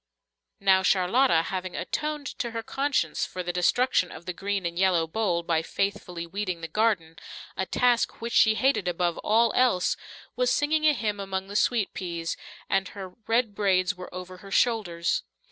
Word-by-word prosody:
Now 190 -1 +4
Charlotta, 185 +1 +3
having 185 0 -4
atoned 300 -1 -3
to 235 - -1
her 230 0 -5
conscience 270 - 0
for 185 - -4
the 175 0 -3
destruction 180 +2 +2
of 170 - -10
the 180 - -3
green 195 +1 -2
and 170 +1 -3
yellow 185 -3 +3
bowl 170 -1 -1
by 165 -1 +1
faithfully 180 -1 -3
weeding 185 -1 -4
the 165 - -4
garden, 175 -4 0 0.4
a 190 - -2
task 245 -1 +2
which 235 +1 -4
she 220 -1 +5
hated 260 -6 +1
above 175 -1 0
all 225 +1 +3
else, 245 -8 +3 0.4
was 250 0 +1
singing 305 +4 +2
a 300 - +5
hymn 210 -6 -2
among 190 -1 -4
the 205 - -7
sweet 220 -1 +1
peas, 170 -3 -4 0.3
and 195 -1 +1
her 195 -1 -8 0.2
red 230 -1 +2
braids 190 -2 +2
were 180 -2 -10
over 185 0 -8
her 195 +2 -12
shoulders. 195 -7 +1
195 Hz, 175 wpm, -27 LUFS, 180-230 Hz, 0.4 s, she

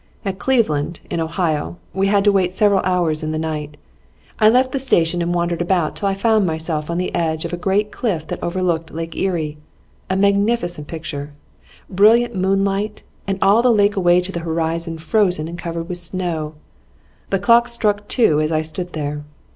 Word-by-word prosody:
At 195 0 -3
Cleveland, 170 - +1
in - - -1
Ohio, 165 -1 -1 0.2
we 195 +1 +1
had 200 0 +3
to 205 - +5
wait 190 -3 +2
several 200 +1 +3
hours 175 -4 0
in 155 - -3
the 155 - -2
night; 150 -2 -4 0.6
I 215 -1 +6
left 255 +3 +3
the 275 - -1
station 175 -9 +2
and 170 0 -1
wandered 175 0 -1
about 175 -3 0
till 200 - -1
I 195 - 0
found 220 +1 +2
myself 160 -1 -2
on 170 - -1
the 180 - -2
edge 160 -2 -1
of - - -5
a - - +1
great 200 +4 0
cliff 180 -10 -2
that - - -6
looked 170 -2 -1
over - - -8
Lake 165 -1 -5
Erie. 160 -5 -2 0.5
A 190 - +1
magnificent 200 -5 +1
picture! 150 -3 -6 0.5
Brilliant 220 +5 +4
moonlight, 195 +2 0 0.2
and 195 -1 -1
all 200 +4 +5
the 250 0 +4
lake 205 -2 +3
away 175 -2 +4
to 180 +2 -5
the 170 - -4
horizon 165 0 -2
frozen 175 -1 +1
and 170 +1 -7
covered 170 -1 -4
with 180 -1 -4
snow. 170 -3 -2 0.7
The 195 - +1
clocks 235 +4 +4
struck 210 -3 0
two 160 - +3
as 155 +1 -1
I 155 0 +1
stood 175 +3 -5
there. 150 -1 -4
175 Hz, 190 wpm, -20 LUFS, 160-200 Hz, 0.7 s, I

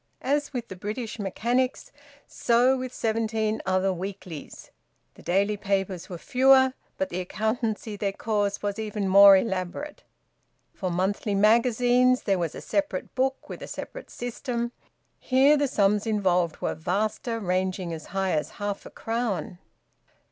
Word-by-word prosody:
As 290 +2 0
with 245 -4 -4
the 190 - -8
"British 215 +4 -5
Mechanics," 240 +6 -1 0.3
so 245 +3 +3
with 255 -1 -4
seventeen 220 -2 -1
other 190 0 +2
weeklies. 185 -3 -8 0.4
The - - -16
daily 200 +3 +1
papers 195 -3 -2
were 180 - -5
fewer, 260 +4 +4 0.2
but 190 - -1
the 180 - -3
accountancy 220 +2 -2
they 200 -1 -1
caused 205 -1 -1
was 205 +1 -2
even 210 -2 -2
more 195 +1 +9
elaborate. 190 +8 -3 0.7
For 185 - -3
monthly 195 +3 -1
magazines 245 +4 +4
there 195 -3 +1
was 165 -3 -2
a - - -7
separate 300 0 -2
book 265 +1 -1
with - - -8
a - - -6
separate - - -8
system; 240 0 -4 0.5
here 270 +3 +4
the 290 -1 +1
sums 210 -3 +2
involved 180 -6 +1
were - - -1
vaster, 215 +7 -2
ranging 185 -2 -1
as 160 -1 -8
high 195 -1 -1
as 150 -1 0
half 205 -1 -4
a - - -10
crown. 225 -6 -3
210 Hz, 145 wpm, -26 LUFS, 190-245 Hz, 0.7 s, more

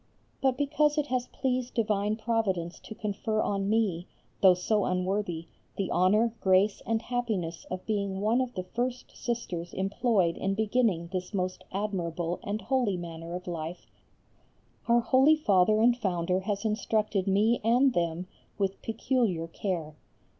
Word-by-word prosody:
But 265 -2 +2
because 295 +1 +2
it 300 - +2
has 255 -1 0
pleased 255 -2 -2
divine 210 -2 +1
Providence 215 -6 -1
to 220 - -10
confer 215 +1 -2
on 195 -2 0
me, 205 -6 +1 0.3
though 185 -2 +7
so 205 +3 +1
unworthy, 180 -2 -1 0.3
the 195 -2 -1
honour, 210 +6 +3
grace 190 +2 +3
and 225 0 0
happiness 215 -10 -2
of 185 0 -5
being 200 -3 -1
one 220 +5 +2
of 250 -1 -3
the 185 - -2
first 245 +6 -4
sisters 180 -8 -4
employed 195 -2 +1
in 195 0 -1
beginning 215 -6 +1
this 185 +2 -3
most 185 -1 -2
admirable 175 -4 -2
and 210 +2 -3
holy 245 -8 +1
manner 170 0 -6
of 180 - -6
life, 170 0 -5 1.0
our 235 0 +5
holy 265 +6 +5
Father 215 -7 +3
and 240 +1 +5
Founder 185 -5 0
has 200 +2 -3
instructed 215 -2 0
me 210 +5 +3
and 250 +4 +4
them 170 0 -1 0.3
with 195 -1 -1
peculiar 225 -7 0
care. 165 -3 -3
205 Hz, 145 wpm, -29 LUFS, 180-230 Hz, 1.0 s, though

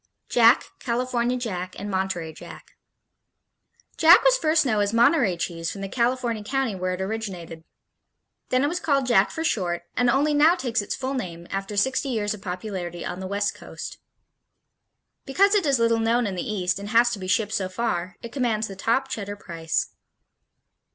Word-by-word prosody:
Jack, 235 +1 +5
California 245 0 -1
Jack 185 -7 -4
and 205 - -5
Monterey 190 -4 -2
Jack - - -12 1.3
Jack 335 +3 +7
was - - +5
first 315 - +2
known 215 -5 +1
as 200 0 +1
Monterey 235 - +3
cheese 165 -1 -3
from 195 - -7
the 195 - -3
California 235 0 -1
county 265 0 -1
where 185 -1 -2
it 185 - -7
originated. 190 -6 -5 0.9
Then 255 +1 +2
it - - +3
was 350 +4 -2
called 280 -6 +1
Jack 200 -6 +4
for 320 - -4
short, 175 - -1
and 245 -1 +2
only 285 +4 +2
now 305 +4 +5
takes 245 - -1
its 205 - -4
full 265 0 -3
name 170 -9 -5
after 195 +1 -4
sixty 265 +6 +1
years 215 -3 -1
of 210 - -10
popularity 180 -2 -5
on 180 - -5
the 190 - -5
West 200 +1 -1
Coast. - - -9 1.3
Because 395 +9 +3
it 395 -7 +2
is 275 -2 +3
little 230 -1 +2
known 230 +2 +2
in 200 - -2
the 185 +3 -3
East 185 -2 -1
and 200 +1 -7
has 235 +2 +4
to 215 - -4
be 185 - -6
shipped 210 +3 +1
so 190 -3 -1
far, 185 -4 -2
it 235 - -7
commands 225 -5 0
the 195 - -8
top 230 +7 0
Cheddar 205 -5 -5
price. 165 -5 -3
220 Hz, 185 wpm, -24 LUFS, 190-255 Hz, 1.3 s, Jack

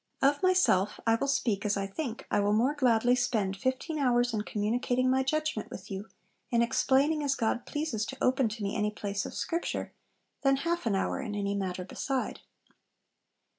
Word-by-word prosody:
'Of 280 +1 +3
myself 365 - +3
I 225 - +4
will 230 +5 0
speak 220 -7 0
as 205 -1 +1
I 195 - -1
think; 230 +4 -5
I - - +3
will 205 0 +2
more 245 +7 +3
gladly 245 -4 +3
spend 235 -6 0
fifteen 260 - -2
hours 245 -3 +2
in 215 - 0
communicating 245 +5 0
my 265 0 +3
judgment 305 -3 -1
with 195 +1 -9
you, 195 +2 -5 0.4
in 235 -2 +3
explaining 275 +5 +2
as 280 -2 +1
God 235 0 -1
pleases 295 -8 -2
to 265 - -6
open 255 -2 +2
to 215 0 -6
me 200 +2 -2
any 210 -1 +1
place 200 -1 -3
of - - -9
Scripture, 335 +1 -2 0.5
than 275 -1 +4
half 340 -5 0
an 205 - +2
hour 195 - -1
in 215 -6 -4
any 200 -1 -1
matter 185 -2 -3
beside.' 265 +7 -3
240 Hz, 185 wpm, -29 LUFS, 205-270 Hz, 0.5 s, I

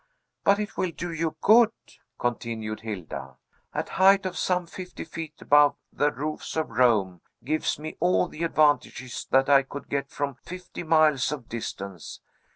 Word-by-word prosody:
"But 200 0 +5
it 210 0 -5
will 185 - 0
do 170 +1 -5
you 160 -1 -2
good," 225 +1 +7 0.5
continued 115 -2 -3
Hilda. 105 -7 -6 0.4
"A - - -3
height 195 +1 +4
of 185 -1 -3
some 180 -1 0
fifty 180 +2 -8
feet 160 -1 -7
above 145 0 +5 0.2
the 145 0 +2
roofs 150 +2 -5
of 160 -6 -1
Rome 105 -7 +2 0.2
gives 155 +5 0
me 155 +1 -7
all 180 +1 +3
the 160 - -10
advantages 145 -6 +1
that 135 0 +4
I 140 -1 +6
could 140 +1 -9
get 140 0 -2
from 145 -1 -3
fifty 180 +7 -9
miles 155 -5 +3
of 135 -6 -6
distance. 100 -6 -6
150 Hz, 160 wpm, -26 LUFS, 120-170 Hz, 0.5 s, good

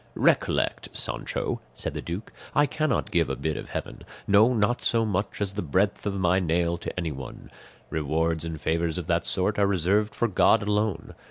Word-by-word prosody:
"Recollect, - - +1
Sancho," - - -3
said - - -4
the - - -4
duke, 90 +6 -6 0.2
"I 145 - +5
cannot 155 +2 -1
give 85 -4 +2
a - - -1
bit 80 -1 -2
of - - -7
heaven, - - -5 0.2
no 105 +4 +5
not 120 +1 +1
so 115 -1 +2
much 100 -1 -2
as 100 -2 0
the 105 - -2
breadth 95 +7 0
of 100 -1 -1
my 90 0 +3
nail, 85 -1 +1
to - - -4
anyone; 75 -7 -6 0.4
rewards 80 +1 0
and 80 -2 -5
favours 80 +2 0
of 90 - -4
that 85 0 0
sort 100 +2 +2
are 100 - +4
reserved 100 +3 +1
for 120 - +1
God 110 +2 +4
alone. 105 0 -1
95 Hz, 185 wpm, -26 LUFS, 85-105 Hz, 0.4 s, I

